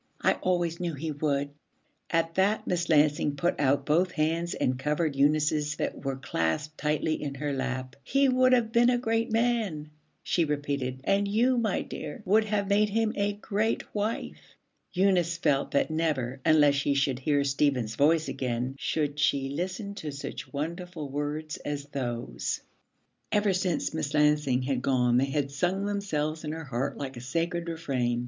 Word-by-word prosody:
I - - +3
always 175 -2 0
knew 170 -3 -2
he 155 +3 -4
would.' 145 -1 -1 0.6
At 165 0 +1
that 195 +4 +2
Miss 175 -1 -1
Lansing 150 -2 +3
put 175 +5 0
out 140 -1 +2
both 175 +4 +2
hands 165 +2 0
and 125 0 0
covered 150 +1 0
Eunice's 150 +1 +2
that - - -3
were 135 -1 -1
clasped 135 - -2
tightly 155 +1 0
in 140 -2 -4
her 145 +1 -2
lap. 130 -1 -3
'He 275 - +3
would 255 0 +4
have 240 -3 +3
been 235 +1 +5
a 250 - +3
great 230 -2 0
man,' 220 -10 0 0.3
she 170 - +1
repeated, 140 -4 -2
'and 200 +4 +2
you, 235 +6 +3
my 225 -5 0
dear, 150 - -7
would 215 +4 +4
have 205 -2 0
made 205 +1 +3
him 220 +1 +1
a 205 0 0
great 210 +2 -2
wife.' 210 +2 -4 0.4
Eunice 180 -3 +2
felt 140 -4 +1
that 140 - +1
never, 140 -5 -1
unless 150 -2 +5
she 140 0 +1
should 135 -2 +1
hear 145 +1 +2
Stephen's 135 -5 +1
voice 155 +4 +3
again, 125 0 -2
should 150 -2 -1
she 135 -1 +2
listen 185 +7 -4
to 160 -6 -6
such 140 0 -7
wonderful 165 +1 -4
words 150 +2 -3
as 145 -1 -4
those. 120 -4 -3 0.7
Ever 205 -1 +3
since 180 -3 -1
Miss 150 -2 -2
Lansing 150 -4 +3
had 130 -1 -1
gone 125 -2 +2
they 130 - +3
had 140 0 -1
sung 180 +7 0
themselves 160 -7 -2
in 150 0 -3
her 160 0 -5
heart 130 -1 -2
like 135 -3 -5
a - - -7
sacred 170 +5 -2
refrain. 130 -8 -1
155 Hz, 170 wpm, -28 LUFS, 140-185 Hz, 0.7 s, been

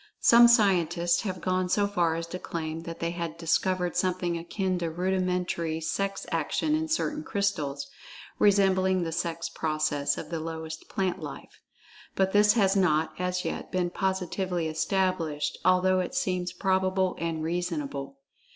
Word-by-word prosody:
Some 235 0 +8
scientists 175 -7 +3
have 185 -4 -4
gone 185 0 0
so 205 +2 +2
far 175 -5 +1
as 165 0 -3
to 180 - -3
claim 160 -2 -4
that 165 0 -7
they 170 0 -1
had 170 -2 -5
discovered 180 +2 0
something 180 -2 0
akin 185 +2 -2
to 170 -1 -2
rudimentary 180 -2 -1
sex 195 +5 -2
action 165 - 0
in 315 +1 0
certain 310 -1 -1
crystals, 200 - -2 0.5
resembling 190 -2 +3
the 165 - -3
sex 170 0 -2
process 155 -2 -1
of 155 - -7
the 165 - -2
lowest 160 0 -6
plant 185 -2 -1
life. - - -9 0.5
But 190 0 +2
this 210 +1 +5
has 200 -4 +3
not, 160 -4 +2
as 180 0 -1
yet, - - -4
been 180 -1 0
positively[Pg 185 -2 -1
51] - - -3
established, 160 -3 -1
although 185 +1 +4
it 180 +7 -3
seems 180 -9 -1
probable 190 -1 +1
and 165 -1 -2
reasonable. 155 -5 -3
180 Hz, 150 wpm, -27 LUFS, 165-190 Hz, 0.5 s, Some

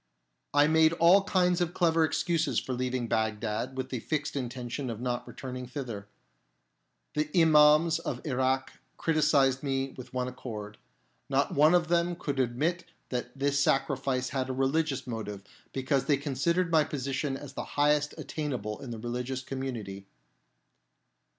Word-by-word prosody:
I 145 0 +5
made 160 +1 +4
all 175 +4 +5
kinds 180 -1 +2
of 175 0 -1
clever 165 -2 +3
excuses 160 -5 +1
for 130 - -4
leaving 125 -1 -2
Bagdad 110 +3 -1
with 130 0 -3
the 125 - -3
fixed 145 +4 -2
intention 125 0 -4
of 115 -2 -5
not 120 0 -2
returning 125 -1 -7
thither. 120 -6 -6 1.1
The 150 0 0
Imams 155 0 +6
of - - -4
Irak 130 -1 0 0.2
criticised 145 -4 +3
me 135 -1 -1
with 125 -1 -10
one 125 0 -2
accord. 110 -5 -7 0.5
Not 140 0 +1
one 155 +4 +5
of 175 -2 +2
them 175 0 +2
could 140 -5 -3
admit 145 +8 0 0.2
that 125 +1 -4
this 140 +1 +1
sacrifice 135 -2 +1
had 130 0 -2
a - - -1
religious 135 +1 0
motive, 105 -4 -5 0.3
because 135 +1 0
they 145 -3 +3
considered 160 +6 0
my 160 -2 +5
position 135 -1 -2
as 140 -1 -10
the - - -4
highest 150 0 +3
attainable 130 -9 -4
in 135 - -7
the 115 - -5
religious 125 +3 -4
community. 115 -8 -5
135 Hz, 150 wpm, -29 LUFS, 125-150 Hz, 1.1 s, Imams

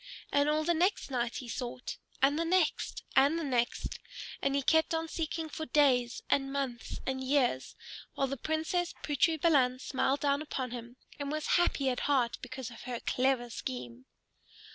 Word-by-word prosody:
And 285 +1 +3
all 305 +1 +2
the 345 +2 +2
next 350 -3 +1
night 240 -2 -1
he 250 - -5
sought, 250 +1 -5 0.3
and 285 +3 +4
the - - +2
next, 340 -1 +1
and 285 +5 +5
the 335 - -2
next. 245 -4 -1 0.4
And 275 0 +1
he 280 - +1
kept 320 +3 +3
on 325 0 -1
seeking 325 0 -3
for 315 +1 -5
days 250 -5 +3
and 270 -1 +1
months 265 -4 -3
and 265 0 -2
years, 260 - +1 0.4
while 275 - +1
the 275 +1 -3
Princess 320 +5 -1
Putri 310 +2 +2
Balan 270 -6 +4
smiled 270 +1 0
down 285 0 +2
upon 265 -5 -3
him 240 0 -7 0.2
and 285 0 -3
was 310 0 -2 0.2
happy 280 -5 +1
at 250 -1 +1
heart 255 -5 +2
because 255 -1 -6
of 230 - -11
her 245 -2 -3
clever 255 -2 +1
scheme. 125 - -6
275 Hz, 175 wpm, -31 LUFS, 250-310 Hz, 0.4 s, and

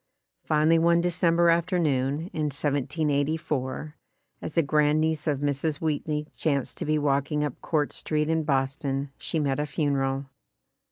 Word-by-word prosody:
Finally 155 +2 +3
one 170 +1 +4
December 170 0 +3
afternoon, 165 -3 0
in 155 -1 -1
1784, 145 0 -1 0.5
as 155 - -6
a 165 - +5
grand 150 +1 +2
niece 160 0 0
of 145 -2 0
Mrs. 145 +1 -1
Wheatley 150 -1 -1
chanced 140 -5 -1
to - - -2
be 155 +1 +1
walking 145 +1 +1
up 145 -4 -4
Court 150 -3 0
Street 150 -1 -1
in 160 0 +1
Boston 135 -1 -1
she 160 - -1
met 140 -2 0
a 150 - -1
funeral. 135 -1 -1
150 Hz, 145 wpm, -26 LUFS, 140-160 Hz, 0.5 s, a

